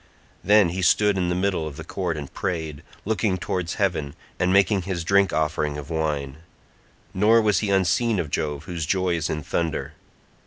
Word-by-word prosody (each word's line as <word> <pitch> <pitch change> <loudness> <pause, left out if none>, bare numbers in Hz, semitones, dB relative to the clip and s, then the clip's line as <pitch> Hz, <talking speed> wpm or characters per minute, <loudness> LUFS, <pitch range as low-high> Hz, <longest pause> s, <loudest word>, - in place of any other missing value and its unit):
Then 105 -2 +5
he 95 +2 -3
stood 105 +3 +3
in 90 -2 0
the 90 - 0
middle 90 -4 0
of 70 -2 -8
the 80 - -7
court 85 -1 -3
and 70 -2 -7
prayed, 80 -6 -3 0.2
looking 105 -2 0
towards 90 -1 -3
heaven, 85 -9 -1 0.2
and 90 +1 +2
making 100 0 +4
his 90 -2 -3
drink 100 +2 +3
offering 75 -1 -1
of 75 +2 -8
wine; 75 -3 -2 0.8
nor 110 +4 +4
was 105 -2 +2
he 105 - -2
unseen 100 +4 +2
of 80 -5 -3
Jove 75 -1 -2
whose 85 -4 -4
joy 95 -1 +1
is 80 -1 -2
in 75 -1 -3
thunder. 80 +1 -2
90 Hz, 185 wpm, -24 LUFS, 80-100 Hz, 0.8 s, Then